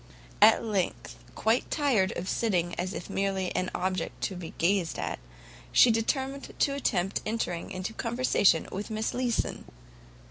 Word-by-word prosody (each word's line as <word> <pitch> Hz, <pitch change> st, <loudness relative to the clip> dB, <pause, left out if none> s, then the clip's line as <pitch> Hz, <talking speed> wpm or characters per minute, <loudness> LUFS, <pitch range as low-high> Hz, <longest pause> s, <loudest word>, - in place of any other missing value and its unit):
At 220 Hz, +2 st, +7 dB
length, 195 Hz, -, -2 dB, 0.2 s
quite 225 Hz, +3 st, +1 dB
tired 250 Hz, -11 st, +2 dB
of 175 Hz, -, -4 dB
sitting 180 Hz, -7 st, 0 dB
as 185 Hz, +1 st, -3 dB
if -, -, -6 dB
merely 195 Hz, -2 st, -1 dB
an 185 Hz, -, 0 dB
object 185 Hz, 0 st, -2 dB
to 195 Hz, -, -2 dB
be 175 Hz, -2 st, -8 dB
gazed 175 Hz, -1 st, +1 dB
at, -, -, -3 dB, 0.5 s
she 245 Hz, -, +7 dB
determined 265 Hz, +5 st, -2 dB
to 280 Hz, -, +2 dB
attempt 195 Hz, -9 st, 0 dB
entering 215 Hz, -6 st, -2 dB
into 190 Hz, +2 st, -4 dB
conversation 230 Hz, -8 st, +2 dB
with 200 Hz, +4 st, -5 dB
Miss 220 Hz, 0 st, -2 dB
Leeson. 245 Hz, -2 st, -1 dB
200 Hz, 145 wpm, -28 LUFS, 185-230 Hz, 0.5 s, At